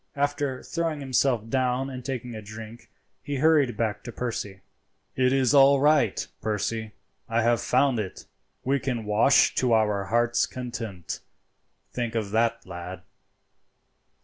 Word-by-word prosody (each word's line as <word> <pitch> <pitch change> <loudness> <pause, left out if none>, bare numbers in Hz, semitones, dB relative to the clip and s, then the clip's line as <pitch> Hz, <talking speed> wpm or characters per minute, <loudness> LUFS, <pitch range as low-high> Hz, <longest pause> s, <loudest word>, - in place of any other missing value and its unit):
After 145 -2 -1
throwing 165 -3 -2
himself 130 -4 +1
down 130 +2 0
and 130 -1 -7
taking 125 -2 -4
a 110 - -6
drink 110 +2 -10 0.3
he 145 0 -4
hurried 145 -3 +3
back 110 -3 -1
to 120 - -7
Percy. 105 -6 -4 0.5
"It 130 0 +3
is 135 0 +2
all 140 0 +7
right, 145 -7 +3 0.2
Percy, 110 +1 -2 0.4
I 115 0 +1
have 120 0 +2
found 130 -1 +2
it. 100 -3 -5 0.4
We 140 +2 +1
can 125 -5 -3
wash 105 +6 +4
to 125 -2 +2
our 105 -3 +2
hearts' 120 +3 +2
content; 115 -8 -6 0.7
think 120 -2 -3
of 105 -3 -2
that, 115 +1 +1
lad." 90 0 -8
120 Hz, 140 wpm, -26 LUFS, 110-135 Hz, 0.7 s, all